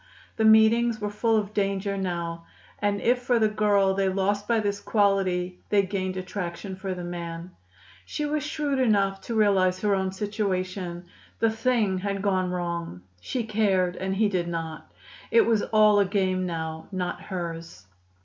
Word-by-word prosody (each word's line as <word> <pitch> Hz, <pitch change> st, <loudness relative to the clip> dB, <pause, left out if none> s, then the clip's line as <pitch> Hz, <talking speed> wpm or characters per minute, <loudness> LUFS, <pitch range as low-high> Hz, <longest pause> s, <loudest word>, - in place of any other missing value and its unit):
The 220 Hz, -, +2 dB
meetings 220 Hz, +1 st, +5 dB
were 210 Hz, -1 st, -3 dB
full 225 Hz, +2 st, +1 dB
of 210 Hz, -1 st, -2 dB
danger 200 Hz, -1 st, -1 dB
now; 170 Hz, -3 st, -4 dB, 0.3 s
and 205 Hz, 0 st, 0 dB
if 245 Hz, +1 st, +2 dB
for 245 Hz, -1 st, +1 dB
the 220 Hz, -1 st, +4 dB
girl 205 Hz, -2 st, +2 dB
they 195 Hz, 0 st, +1 dB
lost 200 Hz, +2 st, 0 dB
by 235 Hz, -1 st, +2 dB
this 205 Hz, -1 st, -1 dB
quality, 190 Hz, -4 st, +1 dB
they 205 Hz, -1 st, +4 dB
gained 190 Hz, -1 st, -3 dB
attraction 185 Hz, 0 st, -5 dB
for 190 Hz, 0 st, -4 dB
the 180 Hz, -, -6 dB
man. 170 Hz, 0 st, -6 dB, 0.5 s
She 295 Hz, -, -4 dB
was 295 Hz, 0 st, -1 dB
shrewd 300 Hz, -2 st, -1 dB
enough 200 Hz, -5 st, +2 dB
to 230 Hz, -, -5 dB
realize 190 Hz, -4 st, +3 dB
her 210 Hz, -1 st, +2 dB
own 190 Hz, -1 st, 0 dB
situation. 185 Hz, -3 st, -3 dB, 0.3 s
The 225 Hz, -1 st, +2 dB
thing 220 Hz, -4 st, +1 dB
had 200 Hz, 0 st, -3 dB
gone 185 Hz, -2 st, +1 dB
wrong. 170 Hz, -, -4 dB, 0.2 s
She 240 Hz, -, -3 dB
cared, 200 Hz, -5 st, +1 dB
and 190 Hz, +1 st, -2 dB
he 215 Hz, +2 st, +3 dB
did 180 Hz, -4 st, -1 dB
not. 165 Hz, -2 st, -5 dB, 0.4 s
It 460 Hz, -3 st, +5 dB
was 220 Hz, -3 st, +2 dB
all 215 Hz, -1 st, +4 dB
a 200 Hz, -, +4 dB
game 185 Hz, -2 st, 0 dB
now, 160 Hz, -1 st, -5 dB
not 185 Hz, -2 st, -3 dB
hers. 165 Hz, -, -6 dB
195 Hz, 170 wpm, -26 LUFS, 180-215 Hz, 0.5 s, meetings